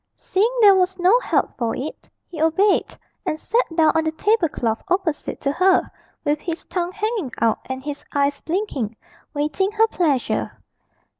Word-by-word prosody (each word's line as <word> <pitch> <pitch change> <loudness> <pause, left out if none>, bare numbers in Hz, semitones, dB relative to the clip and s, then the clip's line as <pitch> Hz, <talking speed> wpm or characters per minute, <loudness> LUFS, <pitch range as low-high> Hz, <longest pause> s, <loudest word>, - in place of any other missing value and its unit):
Seeing 405 +5 +1
there 410 -2 +8
was 375 0 +1
no 375 +7 +4
help - - 0
for 230 -2 -1
it, 285 +4 -7 0.2
he 320 -3 -7
obeyed, 380 +6 +2 0.3
and 310 - -2
sat 470 +8 +1
down 320 -2 +5
on 320 - +2
the 315 - 0
table 410 0 +2
cloth 225 -4 -2
opposite 365 -5 -1
to 275 - 0
her, 370 +5 +3 0.3
with 295 +1 +1
his 335 -2 -5
tongue 350 -1 -2
hanging 420 - -2
out 225 -1 +2
and 260 0 -5
his 285 0 -6
eyes 280 0 0
blinking, 315 - -2 0.4
waiting 305 +7 0
her 445 +1 +4
pleasure. 295 - 0
330 Hz, 165 wpm, -22 LUFS, 285-385 Hz, 0.4 s, there